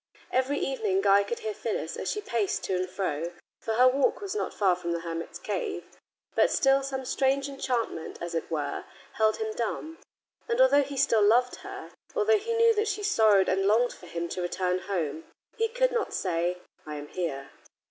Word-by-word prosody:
Every 260 +3 +1
evening 220 -10 0
Guy 200 0 +5
could 230 +4 -4
hear 215 - -3
Phyllis 205 -7 -3
as - - -3
she 420 - -2
paced 230 - -1
to 190 - -1
and 185 0 -1
fro, 170 -3 -2 0.3
for 225 - -2
her 250 +2 +6
walk 270 +2 +2
was 400 -2 -4
not 425 - -2
far 190 -3 +2
from 170 -1 -3
the 170 - -2
hermit's 165 0 -5
cave. 445 -5 -3 0.5
But - - +4
still 270 0 +3
some 265 -1 -4
strange 270 +2 +1
enchantment, 250 - -3
as 170 0 -5
it 165 - -2
were, 150 -3 -3 0.3
held 215 0 +3
him 220 -1 -3
dumb, 310 +8 -4 0.5
and 465 +1 0
although - - +6
he 280 0 -5
still 230 -5 +3
loved 240 +4 +4
her, 390 0 -9 0.2
although 440 -2 +4
he 460 +3 -2
knew 460 0 +5
that 425 0 0
she 415 0 -2
sorrowed 215 - +4
and 195 +1 +2
longed 235 +4 +3
for 180 - -14
him 170 0 -3
to 180 - -3
return 180 +1 0
home, 165 -5 -3 0.3
he 450 - +1
could - - +1
not 470 -3 -1
say, 175 -1 0 0.3
"I 150 - -6
am 145 0 -7
here." 140 -7 -4
220 Hz, 200 wpm, -28 LUFS, 180-285 Hz, 0.5 s, her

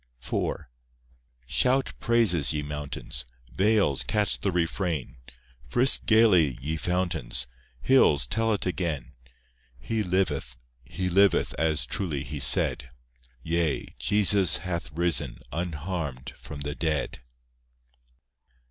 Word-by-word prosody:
IV - - -2 0.9
Shout 125 - +1
praises, 110 -11 +3
ye 75 -1 -2
mountains, 75 -3 -5 0.3
Vales 100 -7 +2
catch 105 -1 0
the 100 - 0
refrain; 85 -5 -2 0.5
Frisk 125 - +3
gaily, 95 - +4
ye 75 +5 -3
fountains; 80 -7 -2 0.4
Hills, 75 - +4
tell 115 - 0
it 105 - -1
again— 85 -8 -3 0.7
He 110 - -3
liveth, 85 - -1 0.3
He 95 +7 -4
liveth, 100 +2 +3
As 80 -4 +1
truly 75 -1 -3
He 75 +2 -6
said; 65 0 +2 0.5
Yea, 85 0 -1
Jesus 100 -4 +4
hath 85 -3 -4
risen 80 -7 -1
Unharmed 80 -4 -4
from 70 - -10
the 75 +1 -3
dead. 75 -5 -2
85 Hz, 105 wpm, -26 LUFS, 70-95 Hz, 0.9 s, gaily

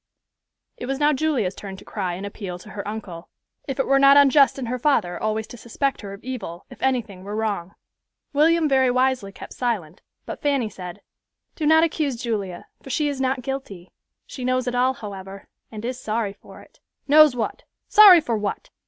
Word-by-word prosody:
It 245 - -6
was 270 0 -2
now 295 +1 +3
Julia's 265 -10 0
turn 195 -1 -9
to - - -14
cry 185 -4 -3
and 190 +3 -6
appeal 200 -3 -6
to 210 +4 -13
her 200 -1 -6
uncle, 200 -6 -7 0.4
if 270 -1 -4
it 270 - +2
were 275 0 +3
not 275 +1 +7
unjust 280 0 +5
in 265 - -4
her 250 +2 -3
father 215 -11 +1
always 215 0 -1
to 245 - -12
suspect 265 +4 -2
her 200 -2 -8
of 200 +1 -11
evil, 235 -9 -6
if - - -13
anything 230 -8 -1
were 205 +2 -6
wrong. 205 -4 -3 0.6
William 320 +2 +3
very 265 -2 +3
wisely 255 -4 +1
kept - - -11
silent, 200 -10 -3 0.2
but - - -7
Fanny 275 -7 0
said, 180 -3 -9 0.5
"Do 305 - -1
not 320 +1 +6
accuse 310 -5 0
Julia, 210 -7 -4 0.2
for - - -11
she 295 +2 0
is 275 -2 -4
not 260 -1 0
guilty. 230 -9 -6 0.3
She 255 - -8
knows 255 0 0
it 245 - -2
all, 255 +1 +2
however, 195 -3 -9 0.2
and 215 0 -7
is 255 +1 -4
sorry 215 -2 -2
for - - -15
it." - - -24 0.3
"Knows 300 -2 +7
what? 235 - -3 0.3
Sorry 395 -5 +9
for 235 -6 -2
what? 210 -1 -4
245 Hz, 195 wpm, -23 LUFS, 200-275 Hz, 0.6 s, Sorry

